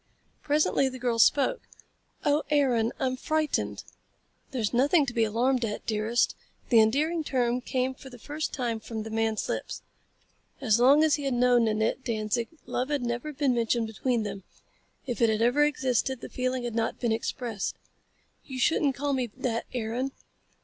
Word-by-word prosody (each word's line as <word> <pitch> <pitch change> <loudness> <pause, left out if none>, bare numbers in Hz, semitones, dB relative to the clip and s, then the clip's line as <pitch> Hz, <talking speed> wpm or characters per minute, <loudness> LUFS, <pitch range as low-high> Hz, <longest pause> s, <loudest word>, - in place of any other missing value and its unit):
Presently 290 -2 +2
the 260 - -8
girl 240 -2 -1
spoke. 290 - +4 0.6
"Oh, 290 +1 +3
Aaron, 255 -6 +2
I'm 260 -1 0
frightened!" 310 +3 -1 0.7
"There's 240 -6 -2
nothing 285 +5 +4
to 250 - -4
be 230 -2 +2
alarmed 240 +4 +1
at, 210 -2 -3
dearest." 220 +2 +1 0.4
The 235 - +6
endearing 300 +9 +2
term 250 -3 0
came 255 +1 -1
for 265 0 -12
the 250 - -12
first 300 +6 -4
time 235 -4 -2
from 220 0 -6
the 220 - -7
man's 220 -1 0
lips. - - -4 0.8
As 235 -5 +2
long 275 +5 +6
as 310 -2 +3
he - - -5
had 270 -2 0
known 245 -1 +4
Nanette 220 +4 0
Danzig, 225 -1 -1 0.2
love 255 +3 -2
had 290 -3 -1
never 240 +5 -3
been 275 -2 +1
mentioned 235 0 +1
between 225 +1 -1
them. 195 -2 -5 0.6
If 245 -3 -4
it 230 - +5
had 220 +1 +1
ever 250 +5 +4
existed, 265 -3 0
the - - -7
feeling 255 0 -2
had 240 -2 -3
not 225 0 -1
been 240 -2 0
expressed. 225 -1 -3 0.7
"You 260 - -8
shouldn't 280 0 +2
call 285 +1 -1
me 255 -2 0
that, 230 -2 -2
Aaron." 245 +3 -2
245 Hz, 170 wpm, -27 LUFS, 230-270 Hz, 0.8 s, The